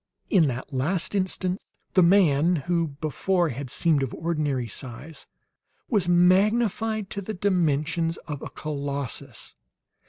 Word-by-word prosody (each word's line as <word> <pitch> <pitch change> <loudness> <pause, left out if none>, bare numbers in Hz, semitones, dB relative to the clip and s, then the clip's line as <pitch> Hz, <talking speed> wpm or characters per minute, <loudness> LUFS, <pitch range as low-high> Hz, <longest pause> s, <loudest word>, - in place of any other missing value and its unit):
In 175 -7 +5
that 125 +1 -4
last 160 +10 0
instant 185 -1 -1 0.3
the 185 - +5
man 170 -3 +4
who 165 +2 0
before 155 +5 0
had 135 0 -5
seemed 155 0 +2
of 135 - -3
ordinary 150 -7 -1
size, 135 +7 -8 0.6
was 200 -7 +2
magnified 210 +4 +3
to 200 - -4
the 215 +3 -5
dimensions 165 -3 +1
of 150 -3 -5
a - - -6
colossus. 140 -4 -4
165 Hz, 125 wpm, -25 LUFS, 140-185 Hz, 0.6 s, In